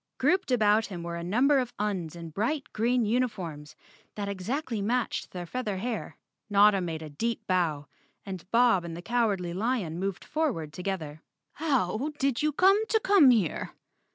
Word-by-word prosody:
Grouped 370 -2 +2
about 220 -3 +3
him 175 -4 -7
were 170 0 -4
a 170 - -5
number 255 +10 +3
of 245 -2 -3
Uns 190 -6 -2
in 165 -1 -8
bright 240 - -1
green 235 +2 +1
uni¬ 245 +4 +2
forms 160 -8 -8 0.4
that 205 -1 -3
exactly 220 +4 -3
matched 240 +4 -1
their 180 -1 -6
feather 210 0 -3
hair. 225 +2 -4 0.3
Notta 205 -1 +5
made 165 -3 -4
a 155 - -7
deep 230 +10 -3
bow 165 -6 0 0.4
and 185 -2 -7
Bob 230 -6 +4
and 170 -1 -6
the 175 - -9
Cowardly 205 -6 0
lion 195 -5 -1
moved 195 -1 -3
forward 235 - -2
together. 160 -4 -4 0.3
"How 270 - 0
did 275 -4 0
you 305 0 +2
come 390 +7 +4
to 445 - +2
come 390 -10 +6
here?" 215 -10 +1
210 Hz, 170 wpm, -28 LUFS, 175-250 Hz, 0.4 s, come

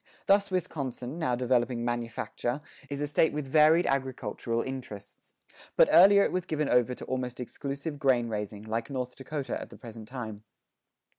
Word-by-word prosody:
Thus 200 +1 +4
Wisconsin, 145 -6 -3
now 125 -7 +1
developing 120 -1 +1
manufacture, 120 +2 -3 0.3
is 140 0 -4
a - - +1
State 150 +2 +2
with 150 -1 -3
varied 155 +4 +5
agricultural 125 -3 -1
interests. 125 -7 -8 0.4
But - - +6
earlier 200 +2 +8
it - - 0
was 185 -1 -2
given 150 -2 0
over 125 0 +3
to - - -8
almost 125 -1 -3
exclusive 140 +4 -5
grain 130 -5 +3
raising, 105 -1 -4
like 115 +1 -3
North 125 -2 -4
Dakota 140 +1 -4
at - - -8
the - - -13
present 115 -2 -10
time. 110 -4 -7
130 Hz, 160 wpm, -29 LUFS, 120-145 Hz, 0.4 s, earlier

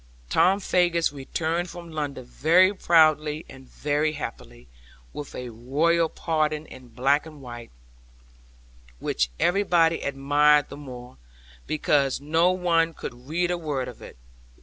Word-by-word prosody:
Tom 195 +2 +4
Faggus 175 -5 +1
returned 160 +5 -2
from 170 -1 -10
London 145 -4 -4
very 175 +9 +4
proudly 155 -4 +3
and 135 -1 -14
very 150 +1 -1
happily, 90 - -8 0.5
with 145 - -8
a 125 -1 -6
royal 155 +9 +1
pardon 155 -2 -1
in 130 -4 -13
black 135 +6 +1
and 155 -2 -12
white, 120 -3 -9 1.3
which - - -1
everybody 175 -3 +2
admired 145 +1 +3
the - - -8
more, 125 -3 -10 0.5
because 145 -3 +1
no 160 +5 +2
one 170 -3 +1
could 125 +1 -9
read 175 +3 0
a 175 - -2
word 145 -5 -3
of 125 - -10
it. - - -12
150 Hz, 130 wpm, -25 LUFS, 135-170 Hz, 1.3 s, Tom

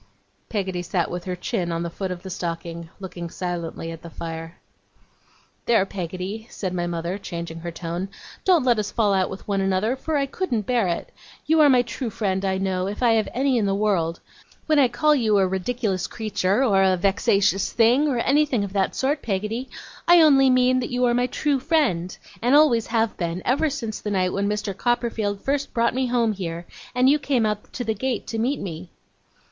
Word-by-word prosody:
Peggotty 190 -4 -2
sat 175 -1 -1
with 175 0 -5
her 180 -1 -3
chin 175 -1 -2
on 165 0 -2
the 170 - -3
foot 190 +2 -4
of 180 0 -6
the 190 - -7
stocking, 170 -1 -5
looking 175 -3 -6
silently 170 -2 -4
at 165 0 -9
the 170 - -9
fire. 165 +1 -7 1.1
'There, 225 -5 +4
Peggotty,' 190 +4 -5
said 185 -3 -4
my 175 -1 -1
mother, 170 +3 -3
changing 170 -3 -6
her 170 +1 -5
tone, 170 +3 -4 0.3
'don't 355 -6 +4
let 240 -3 +3
us 210 - -2
fall 210 -4 +1
out 190 -1 +1
with 190 - -9
one 200 -1 0
another, 195 +5 +1
for 300 +3 -2
I 280 - +1
couldn't 265 - -2
bear 240 -4 +1
it. 170 - -3 0.3
You 320 +2 +3
are 295 - +7
my 250 -2 +5
true 240 +1 -4
friend, 195 -3 -1
I 190 -1 0
know, 190 -1 -1
if 205 +5 -4
I 235 - +5
have 220 -1 +2
any 260 -1 +1
in 205 - +1
the 195 - +1
world. 185 -6 0 0.4
When 310 -2 +3
I 265 - +6
call 300 +6 +2
you 220 -7 +2
a 195 - +4
ridiculous 190 0 -1
creature, 215 +1 0
or 200 -7 +3
a 190 -1 +3
vexatious 195 +1 +2
thing, 240 +6 +4
or 270 -4 0
anything 275 -2 +2
of 200 -1 -5
that 195 -2 0
sort, 285 +2 0
Peggotty, 215 +5 -3 0.4
I 345 0 +8
only 270 -4 +6
mean 255 0 +4
that 245 - -3
you 250 0 +1
are 240 - +3
my 245 +1 +2
true 275 +2 0
friend, 255 - 0 0.2
and 245 +4 +3
always 275 -7 +5
have 225 -1 0
been, 170 +1 -3
ever 285 +5 +2
since 230 -6 -5
the 210 - -3
night 185 -2 +1
when 200 +1 0
Mr. 210 -2 -2
Copperfield 230 -3 -1
first 280 0 -2
brought 235 0 +2
me 260 0 0
home 235 -3 +1
here, 170 -3 -5 0.3
and 250 +1 +4
you 295 +3 +5
came 265 -5 +1
out 210 -1 -3
to 245 - -3
the 220 -1 0
gate 245 +2 -2
to 225 - -4
meet 260 +5 0
me. 175 -1 -6
210 Hz, 210 wpm, -23 LUFS, 185-250 Hz, 1.1 s, I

